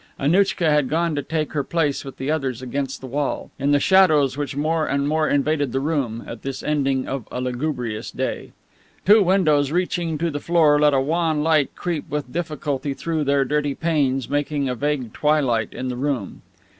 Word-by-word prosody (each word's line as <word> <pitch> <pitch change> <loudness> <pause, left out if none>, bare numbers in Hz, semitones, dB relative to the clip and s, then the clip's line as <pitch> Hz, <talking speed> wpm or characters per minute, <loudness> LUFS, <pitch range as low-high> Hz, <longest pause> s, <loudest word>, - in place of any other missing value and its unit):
Annouchka 175 +3 +2
had 150 -3 +2
gone 165 +1 +1
to 145 - -1
take 155 +1 -3
her 145 -2 0
place 150 -2 -1
with 135 -2 -9
the 135 +3 -2
others 130 -5 -2
against 135 +1 -3
the - - -7
wall, 140 +2 -3
in 140 +1 +1
the 145 - +4
shadows 155 -7 +4
which 145 -1 -4
more 155 +2 0
and 140 0 0
more 155 +1 +1
invaded 145 -2 +1
the 135 - +1
room, 135 -6 -2
at 115 - -8
this 135 -1 -5
ending 135 -3 0
of 130 -5 -4
a - - -4
lugubrious 125 -3 -3
day. - - -4 0.5
Two 210 +2 +7
windows 155 -7 +3
reaching 175 -2 -1
to 165 +2 -1
the 145 - -3
floor 155 -3 +3
let 150 -1 +4
a - - +4
wan 155 +2 0
light 155 -4 +2
creep 170 -3 -4
with 145 -3 -4
difficulty 150 -4 -3
through 160 -1 -2
their 140 0 +2
dirty 145 0 0
panes, 140 -6 0
making 145 -1 -1
a 125 - -1
vague 135 -3 -2
twilight 135 -8 +1
in 130 - -4
the 125 - -4
room. 130 -7 -3
145 Hz, 195 wpm, -22 LUFS, 135-155 Hz, 0.5 s, Two